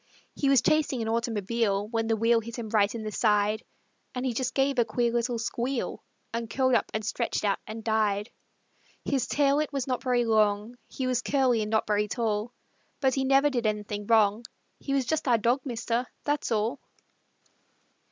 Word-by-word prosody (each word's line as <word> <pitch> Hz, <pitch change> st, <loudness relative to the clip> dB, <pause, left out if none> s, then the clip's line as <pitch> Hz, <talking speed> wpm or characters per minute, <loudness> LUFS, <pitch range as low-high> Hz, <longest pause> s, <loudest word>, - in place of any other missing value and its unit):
He 280 Hz, -, 0 dB
was 270 Hz, -3 st, +5 dB
chasing 290 Hz, -6 st, +2 dB
an -, -, -4 dB
automobile 225 Hz, -2 st, 0 dB
When 225 Hz, -1 st, -1 dB
the 225 Hz, -, +2 dB
wheel 230 Hz, +1 st, +3 dB
hit 230 Hz, +1 st, -8 dB
him 230 Hz, -2 st, -5 dB
right 210 Hz, 0 st, +2 dB
in 225 Hz, -, -5 dB
the 215 Hz, -, -4 dB
side, 210 Hz, 0 st, +2 dB, 0.5 s
So 250 Hz, -, -2 dB
he 255 Hz, -2 st, 0 dB
just 250 Hz, +1 st, -2 dB
gave 270 Hz, -1 st, +2 dB
a -, -, +6 dB
queer 235 Hz, +1 st, 0 dB
little 240 Hz, 0 st, 0 dB
squeal 240 Hz, +2 st, -3 dB, 0.3 s
And 230 Hz, -1 st, -3 dB
curled 260 Hz, 0 st, +1 dB
up -, -, +2 dB
and 220 Hz, -1 st, -3 dB
stretched 210 Hz, 0 st, -1 dB
out 200 Hz, -1 st, +1 dB
and 220 Hz, +1 st, -7 dB
died. 215 Hz, -1 st, 0 dB, 0.7 s
His 270 Hz, -3 st, 0 dB
tail 285 Hz, 0 st, +2 dB
it 305 Hz, -1 st, -1 dB
was 275 Hz, -3 st, -2 dB
not 255 Hz, -2 st, -2 dB
very 245 Hz, -2 st, +1 dB
long, 215 Hz, +1 st, +2 dB
He 260 Hz, -, -4 dB
was 250 Hz, -1 st, +1 dB
curly 255 Hz, -5 st, +2 dB
and 210 Hz, -, -2 dB
not 220 Hz, 0 st, +1 dB
very 210 Hz, 0 st, +1 dB
tall; 220 Hz, 0 st, -1 dB, 0.5 s
But 265 Hz, -2 st, +2 dB
he 270 Hz, -, 0 dB
never 275 Hz, +2 st, +4 dB
did 240 Hz, -4 st, 0 dB
anything 210 Hz, -1 st, -3 dB
wrong 220 Hz, 0 st, +3 dB, 0.4 s
He 275 Hz, -, -2 dB
was 270 Hz, -2 st, +1 dB
just 310 Hz, +3 st, -1 dB
our 240 Hz, -2 st, +5 dB
dog, 240 Hz, +5 st, +1 dB
mister 240 Hz, 0 st, -2 dB, 0.2 s
that's 290 Hz, -3 st, -1 dB
all. 225 Hz, +5 st, 0 dB
235 Hz, 190 wpm, -27 LUFS, 215-255 Hz, 0.7 s, a